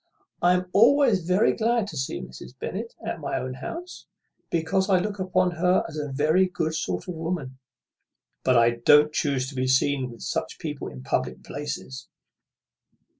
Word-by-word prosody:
I 175 Hz, +1 st, +5 dB
am 180 Hz, 0 st, -1 dB
always 230 Hz, -, +5 dB
very 185 Hz, +3 st, +3 dB
glad 230 Hz, -1 st, +1 dB
to -, -, -9 dB
see 130 Hz, -, -3 dB
Mrs. 65 Hz, -, -10 dB
Bennet 220 Hz, -, -5 dB
at 220 Hz, -, -3 dB
my 145 Hz, -, -2 dB
own 130 Hz, 0 st, -4 dB
house, 335 Hz, -, -8 dB, 0.4 s
because 190 Hz, +4 st, 0 dB
I 190 Hz, -, +5 dB
look 200 Hz, +2 st, -2 dB
upon 185 Hz, -1 st, +1 dB
her 180 Hz, +2 st, +2 dB
as 160 Hz, -, -10 dB
a 145 Hz, -2 st, -4 dB
very 155 Hz, +7 st, +3 dB
good 165 Hz, -3 st, -2 dB
sort 90 Hz, -, -3 dB
of 180 Hz, -, -3 dB
woman; 160 Hz, -6 st, -4 dB, 0.8 s
but 130 Hz, -1 st, +4 dB
I 115 Hz, 0 st, +5 dB
don't 150 Hz, +5 st, +5 dB
chuse 140 Hz, -4 st, 0 dB
to 140 Hz, -, -11 dB
be 130 Hz, 0 st, 0 dB
seen 130 Hz, 0 st, +2 dB
with 115 Hz, -2 st, -12 dB
such -, -, -3 dB
people -, -, -5 dB
in 65 Hz, 0 st, -9 dB
public 65 Hz, -1 st, -2 dB
places." 125 Hz, -, -6 dB
160 Hz, 175 wpm, -25 LUFS, 130-185 Hz, 0.8 s, I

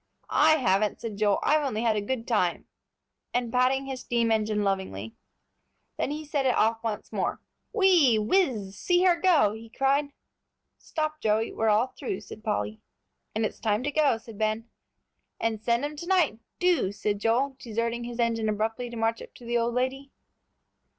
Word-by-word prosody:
"I 310 Hz, +1 st, +6 dB
haven't," 215 Hz, -7 st, +1 dB
said 220 Hz, -3 st, -6 dB
Joel; 205 Hz, -1 st, +3 dB
"I've 305 Hz, 0 st, +3 dB
only 230 Hz, -5 st, -1 dB
had 225 Hz, -2 st, +2 dB
a 210 Hz, -, 0 dB
good 230 Hz, +2 st, -3 dB
time," 195 Hz, -7 st, +1 dB, 0.7 s
and 245 Hz, -2 st, 0 dB
patting 255 Hz, +2 st, +2 dB
his 265 Hz, -2 st, -5 dB
steam 235 Hz, -2 st, 0 dB
engine 215 Hz, -1 st, +1 dB
lovingly. 190 Hz, -, -2 dB, 0.8 s
Then -, -, -1 dB
he 305 Hz, +1 st, -4 dB
set 290 Hz, -1 st, -1 dB
it 255 Hz, -, +2 dB
off 225 Hz, +1 st, +2 dB
once 220 Hz, -2 st, -4 dB
more. -, -, -1 dB, 0.3 s
"Whee, 360 Hz, -, +5 dB
whiz, 215 Hz, -, +1 dB
see 355 Hz, -, +2 dB
her 360 Hz, -2 st, +5 dB
go!" 335 Hz, -, +4 dB
he 225 Hz, +1 st, -10 dB
cried. 275 Hz, +4 st, +1 dB, 0.7 s
"Stop, 310 Hz, -1 st, -3 dB
Joey, 220 Hz, +1 st, +1 dB
we're 220 Hz, 0 st, +1 dB
all 225 Hz, +5 st, +2 dB
through," 210 Hz, -8 st, -3 dB
said 215 Hz, +1 st, -11 dB
Polly. 105 Hz, -, -2 dB, 0.5 s
"And 220 Hz, 0 st, +1 dB
it's -, -, -5 dB
time 215 Hz, +1 st, 0 dB
to 290 Hz, -, -1 dB
go," 290 Hz, -5 st, +3 dB
said 225 Hz, -1 st, -12 dB
Ben. 215 Hz, +1 st, -1 dB, 0.7 s
"And 225 Hz, -2 st, -1 dB
send 235 Hz, +4 st, +1 dB
'em 295 Hz, +1 st, -5 dB
to 340 Hz, -, -7 dB
night, 355 Hz, -11 st, +2 dB, 0.2 s
do," 355 Hz, -, +2 dB
said 205 Hz, 0 st, -2 dB
Joel, 250 Hz, +6 st, +1 dB
deserting 230 Hz, +1 st, -2 dB
his 240 Hz, -1 st, -6 dB
engine 225 Hz, -2 st, +1 dB
abruptly 225 Hz, +3 st, -2 dB
to 235 Hz, -, -7 dB
march 225 Hz, 0 st, 0 dB
up -, -, -12 dB
to 245 Hz, -, -13 dB
the 235 Hz, 0 st, +1 dB
old 235 Hz, +1 st, -1 dB
lady. 265 Hz, +2 st, -1 dB
230 Hz, 180 wpm, -27 LUFS, 215-275 Hz, 0.8 s, I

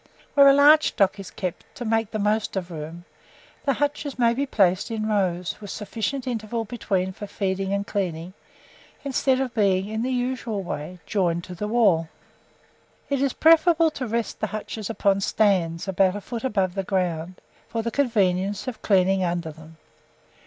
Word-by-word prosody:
Where 280 Hz, -1 st, +7 dB
a 275 Hz, -, +8 dB
large 295 Hz, +2 st, +6 dB
stock 200 Hz, 0 st, +1 dB
is 195 Hz, -, -7 dB
kept, 180 Hz, -3 st, -5 dB
to 245 Hz, -, -6 dB
make 225 Hz, -1 st, +1 dB
the 220 Hz, -, -3 dB
most 210 Hz, +1 st, 0 dB
of 180 Hz, -2 st, -3 dB
room, 165 Hz, +2 st, -7 dB, 0.6 s
the 275 Hz, -, +3 dB
hutches 290 Hz, 0 st, -2 dB
may 235 Hz, -2 st, +3 dB
be 280 Hz, +4 st, -1 dB
placed 190 Hz, -5 st, +2 dB
in 220 Hz, -1 st, -2 dB
rows, 185 Hz, -5 st, 0 dB
with 205 Hz, -, -8 dB
a -, -, -4 dB
sufficient 225 Hz, +5 st, -3 dB
interval 230 Hz, -2 st, -3 dB
between 195 Hz, -4 st, -2 dB
for 205 Hz, -, -8 dB
feeding 195 Hz, -1 st, -2 dB
and 200 Hz, 0 st, -1 dB
cleaning, 180 Hz, -4 st, -3 dB, 0.7 s
instead 265 Hz, -1 st, +1 dB
of 260 Hz, -3 st, -2 dB
being, 200 Hz, -3 st, +2 dB
in 220 Hz, +1 st, -2 dB
the 250 Hz, -, -1 dB
usual 245 Hz, -5 st, -2 dB
way, 175 Hz, +1 st, -5 dB
joined 175 Hz, -5 st, 0 dB
to 180 Hz, -, -8 dB
the 210 Hz, +4 st, -4 dB
wall. 200 Hz, -8 st, +3 dB, 1.0 s
It 275 Hz, -1 st, +1 dB
is 275 Hz, -2 st, +1 dB
preferable 330 Hz, 0 st, +5 dB
to 255 Hz, -4 st, -5 dB
rest 230 Hz, +1 st, -2 dB
the -, -, -1 dB
hutches 215 Hz, -1 st, -5 dB
upon 200 Hz, -3 st, +1 dB
stands, 185 Hz, -5 st, +1 dB
about 190 Hz, 0 st, +2 dB
a 205 Hz, -, -5 dB
foot 235 Hz, +3 st, -6 dB
above 195 Hz, -8 st, 0 dB
the 195 Hz, -, -1 dB
ground, 180 Hz, -2 st, -2 dB, 0.3 s
for 230 Hz, -1 st, -3 dB
the 230 Hz, -, -2 dB
convenience 200 Hz, -6 st, +1 dB
of 255 Hz, -, -5 dB
cleaning 190 Hz, -1 st, +3 dB
under 170 Hz, -2 st, -2 dB
them. 160 Hz, +1 st, -15 dB
205 Hz, 180 wpm, -24 LUFS, 185-240 Hz, 1.0 s, a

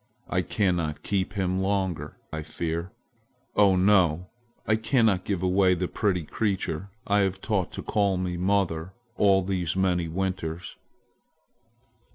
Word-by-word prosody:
I -, -, +2 dB
cannot 85 Hz, -7 st, -1 dB
keep 95 Hz, -2 st, -1 dB
him 95 Hz, -2 st, 0 dB
longer, 95 Hz, -3 st, -1 dB, 0.2 s
I 80 Hz, -, -3 dB
fear. 85 Hz, +3 st, -3 dB, 0.6 s
Oh, 100 Hz, -2 st, +5 dB
no, 90 Hz, -3 st, +3 dB, 0.3 s
I 110 Hz, -, +3 dB
cannot 110 Hz, -4 st, +2 dB
give 95 Hz, -3 st, -2 dB
away 95 Hz, 0 st, +4 dB
the 90 Hz, +1 st, -2 dB
pretty 95 Hz, -5 st, 0 dB
creature 95 Hz, -1 st, -2 dB, 0.2 s
I 100 Hz, 0 st, +2 dB
have 95 Hz, -1 st, +1 dB
taught 95 Hz, -4 st, -1 dB
to -, -, -6 dB
call 100 Hz, -3 st, +1 dB
me 90 Hz, -1 st, -2 dB
'mother' 90 Hz, -2 st, 0 dB, 0.2 s
all 95 Hz, -3 st, +4 dB
these 90 Hz, -3 st, -1 dB
many 90 Hz, -3 st, +1 dB
winters." 90 Hz, -1 st, -3 dB
95 Hz, 135 wpm, -26 LUFS, 90-100 Hz, 0.6 s, Oh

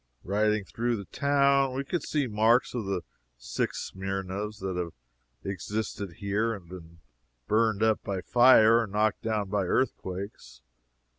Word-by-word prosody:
Riding 105 Hz, +1 st, +1 dB
through 120 Hz, +2 st, -1 dB
the 100 Hz, -, -7 dB
town, 140 Hz, 0 st, +2 dB
we 135 Hz, -, -1 dB
could 170 Hz, +4 st, -2 dB
see 145 Hz, -1 st, -1 dB
marks 115 Hz, +2 st, +2 dB
of 120 Hz, -4 st, -3 dB
the 95 Hz, -3 st, -2 dB, 0.3 s
six -, -, -3 dB
Smyrnas 95 Hz, +2 st, -4 dB
that 95 Hz, -2 st, -4 dB
have 85 Hz, -2 st, -3 dB, 0.5 s
existed 100 Hz, 0 st, -4 dB
here 105 Hz, +5 st, -1 dB
and 95 Hz, -4 st, -12 dB
been 85 Hz, -2 st, -12 dB, 0.5 s
burned 110 Hz, -1 st, +2 dB
up 110 Hz, -1 st, +2 dB
by 95 Hz, -2 st, -3 dB
fire 115 Hz, 0 st, +6 dB
or 115 Hz, -, -1 dB
knocked 105 Hz, +2 st, 0 dB
down 110 Hz, -3 st, -1 dB
by 100 Hz, -2 st, +1 dB
earthquakes. 100 Hz, -3 st, -3 dB
105 Hz, 145 wpm, -28 LUFS, 95-115 Hz, 0.5 s, fire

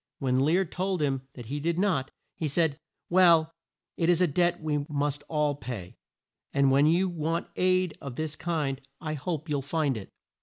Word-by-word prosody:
When 130 Hz, -2 st, +1 dB
Lear 165 Hz, +8 st, +3 dB
told 185 Hz, +2 st, -2 dB
him 135 Hz, -3 st, -1 dB
that 120 Hz, -, -8 dB
he 140 Hz, +6 st, -4 dB
did 165 Hz, +3 st, -1 dB
not, 180 Hz, -9 st, +1 dB, 0.2 s
he 160 Hz, -, -2 dB
said, 155 Hz, 0 st, +1 dB, 0.3 s
"Well, 170 Hz, -3 st, +5 dB, 0.4 s
it 165 Hz, 0 st, +2 dB
is 175 Hz, -1 st, +4 dB
a 180 Hz, -, +5 dB
debt 175 Hz, +2 st, +1 dB
we 150 Hz, -2 st, -1 dB
must 145 Hz, 0 st, -1 dB
all 150 Hz, -2 st, +1 dB
pay, 115 Hz, -9 st, -7 dB, 0.6 s
and 140 Hz, -1 st, +3 dB
when 140 Hz, +2 st, +5 dB
you 175 Hz, +4 st, +3 dB
want 165 Hz, -1 st, -2 dB
aid 185 Hz, -1 st, +2 dB
of 135 Hz, -3 st, -6 dB
this 155 Hz, +1 st, -3 dB
kind 150 Hz, -6 st, -2 dB, 0.2 s
I 155 Hz, -1 st, -3 dB
hope 155 Hz, +2 st, -3 dB
you'll 145 Hz, -2 st, 0 dB
find 145 Hz, -1 st, 0 dB
it." 100 Hz, -, -8 dB
155 Hz, 185 wpm, -28 LUFS, 140-170 Hz, 0.6 s, Well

